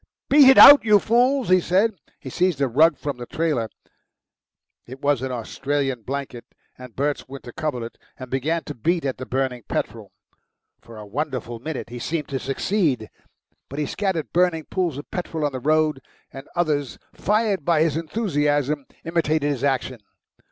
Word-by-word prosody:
"Beat 285 -2 +8
it 265 - +6
out, 285 0 +11
you 210 -2 +5
fools!" 245 +4 +2
he 185 0 +6
said. 195 +7 +2 0.3
He 130 - -9
seized 180 -2 0
a 140 - +2
rug 155 +7 +4
from 145 -3 -4
the 120 -1 -8
trailer 150 -9 -1 1.2
(it 130 +2 -10
was 140 -3 +1
an 130 0 -3
Austrian 135 +2 -2
blanket, 130 0 -5 0.3
and 125 -3 -12
Bert's 145 +1 -2
winter 135 -2 -10
coverlet) 125 -5 -5 0.2
and 130 -2 -10
began 155 +6 -1
to 145 - -7
beat 165 +6 -1
at 130 -2 -3
the 130 - -7
burning 130 -1 -2
petrol. - - -4 0.7
For 115 -1 -13
a 105 - -9
wonderful 120 0 -4
minute 140 -2 -6
he 120 - -6
seemed 155 +3 -3
to 135 - -2
succeed. 135 - -1 0.6
But 140 - -8
he 150 - -1
scattered 190 -2 -3
burning 175 -2 +2
pools 175 -7 -1
of 145 - -9
petrol 165 -4 -3
on 145 - 0
the 130 - -5
road, 155 0 +1 0.3
and 135 +1 -10
others, 150 -6 -1 0.2
fired 210 -4 0
by 160 0 +3
his 160 -3 0
enthusiasm, 150 - -1 0.2
imitated 160 -3 0
his 135 -2 -4
action. 130 -3 -1
145 Hz, 170 wpm, -23 LUFS, 130-170 Hz, 1.2 s, out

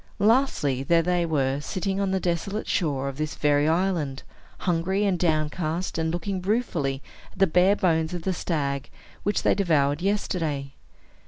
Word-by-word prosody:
Lastly, 210 - +2
there 165 +4 +3
they 175 0 +1
were, 140 -3 0
sitting 190 +5 -2
on 200 -1 0
the 190 0 +1
desolate 185 +4 -2
shore 140 -7 0
of 135 -1 -5
this 155 0 -2
very 145 0 +2
island, 165 -5 0 0.4
hungry 185 +3 +1
and 190 -3 +1
downcast, 160 +1 -1
and 160 0 0
looking 180 +2 -3
ruefully 175 - -1 0.3
at - - -19
the 195 - +5
bare 180 +3 +4
bones 160 -4 +1
of 175 -2 -5
the 190 - 0
stag 140 -6 -2 0.3
which 205 - 0
they - - +4
devoured 155 -6 +1
yesterday. 165 -8 -1
170 Hz, 160 wpm, -25 LUFS, 150-190 Hz, 0.4 s, the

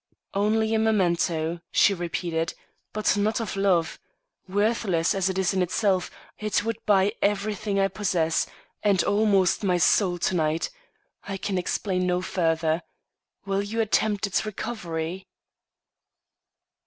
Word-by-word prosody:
"Only 220 +2 +1
a 220 - +2
memento," 175 -6 +1
she 200 - +5
repeated; 170 -2 -2 0.4
"but 215 0 +1
not 210 +2 +1
of 225 -4 -4
love. 190 -4 +1 0.5
Worthless 205 -4 +1
as 195 -1 0
it 190 - -3
is 190 0 +1
in 190 - +1
itself, 185 +1 +1 0.3
it 210 0 0
would 230 0 -3
buy 200 0 +4
everything 205 0 0
I 195 - +4
possess, 180 -6 0 0.3
and 200 -4 +3
almost 200 -3 +2
my 180 -3 +2
soul 180 +1 +3
to 175 - 0
night. 160 -1 0 0.5
I 195 -1 -4
can 190 -1 -2
explain 185 0 -1
no 180 0 +1
further. 165 -3 0 0.6
Will 195 0 0
you 210 +3 -4
attempt 215 -1 +1
its 200 - 0
recovery?" 185 -5 -4
195 Hz, 130 wpm, -25 LUFS, 175-210 Hz, 0.6 s, she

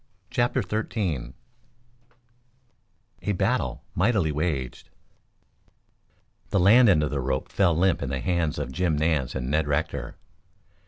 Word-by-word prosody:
CHAPTER 120 0 +1
XIII 95 - -3 1.9
A 105 +3 -1
BATTLE 90 - -1
MIGHTILY 95 -4 +2
WAGED 75 -5 -3 1.6
The 100 - +1
land 110 +6 +6
end 75 -6 +4
of 75 - -1
the 70 -2 -1
rope 65 +7 -2
fell 85 -5 +2
limp 95 +1 +2
in 70 - -3
the 65 0 -2
hands 85 -1 -1
of 65 - -4
Jim 85 0 0
Nance 75 -4 0
and 65 0 -3
Ned 80 0 +1
Rector. 70 -3 -2
80 Hz, 125 wpm, -25 LUFS, 70-95 Hz, 1.9 s, land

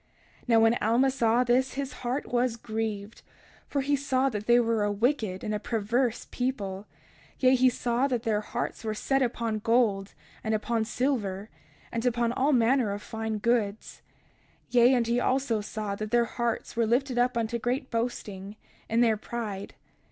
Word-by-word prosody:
31:24 - - -33
Now 230 -2 +5
when 225 +1 +4
Alma 240 +5 +3
saw 240 -2 +2
this 250 +2 +2
his 275 0 -3
heart 255 +3 -2
was 245 -1 0
grieved; 220 -1 -4 0.5
for 280 - -1
he 285 +2 +1
saw 270 -1 +1
that 210 -3 -5
they 240 0 +6
were 230 -2 +1
a 205 - +1
wicked 215 -3 0
and 215 - -2
a 210 - -1
perverse 230 +3 -1
people; 205 -6 -3 0.5
yea, 255 -1 +4
he 255 0 +5
saw 245 +2 0
that 245 -4 -2
their 215 -3 +1
hearts 215 - -4
were 215 -1 -2
set 270 +5 0
upon 230 -3 -1
gold, 215 -4 +1 0.3
and 220 0 0
upon 225 +1 -1
silver, 220 -5 -2 0.4
and 230 -1 -2
upon 240 -1 +1
all 270 +4 +1
manner 245 -3 +3
of 205 - -6
fine 220 -1 -3
goods. 215 -2 -1 0.7
31:25 - - -21
Yea, 245 +1 +6
and 240 -2 +2
he 235 +1 +1
also 255 -4 +1
saw 210 -1 -4
that 215 +1 -4
their 240 +1 +3
hearts 235 0 -3
were 230 -1 +2
lifted 250 +2 +1
up 245 0 +2
unto 230 +1 -1
great 255 +3 -2
boasting, 210 -4 -3 0.3
in 230 +2 +2
their 225 -3 +3
pride. 210 -3 -5
235 Hz, 180 wpm, -28 LUFS, 215-250 Hz, 0.7 s, they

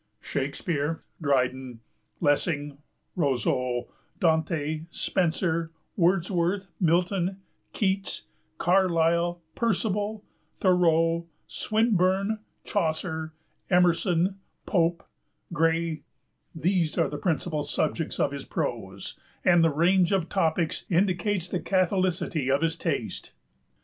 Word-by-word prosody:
Shakespeare, 145 +2 -2 0.2
Dryden, 130 -3 0 0.4
Lessing, 145 -2 0 0.4
Rousseau, 125 -5 0 0.3
Dante, 160 -1 +1
Spenser, 170 -2 0 0.3
Wordsworth, 180 +1 +1
Milton, 180 +2 +1 0.3
Keats, 195 -2 -1 0.3
Carlyle, 175 -1 +2
Percival, 210 -1 -1 0.3
Thoreau, 170 -2 +3 0.2
Swinburne, 210 -1 +1 0.2
Chaucer, 160 -3 -2 0.4
Emerson, 180 +1 +3 0.3
Pope, 170 -3 +1 0.5
Gray, 165 0 +1 0.5
these 170 -1 +1
are - - +3
the 145 - -5
principal 160 -2 -1
subjects 155 +2 -1
of 140 - +2
his 140 -1 -6
prose, - - -4 0.3
and 175 -2 +6
the 165 - +5
range 175 +4 +3
of 185 -4 +1
topics 165 -3 0
indicates 185 +1 +1
the 180 - -2
catholicity 185 -6 0
of 140 +3 +2
his 165 0 +1
taste. - - -3
170 Hz, 90 wpm, -27 LUFS, 160-185 Hz, 0.5 s, and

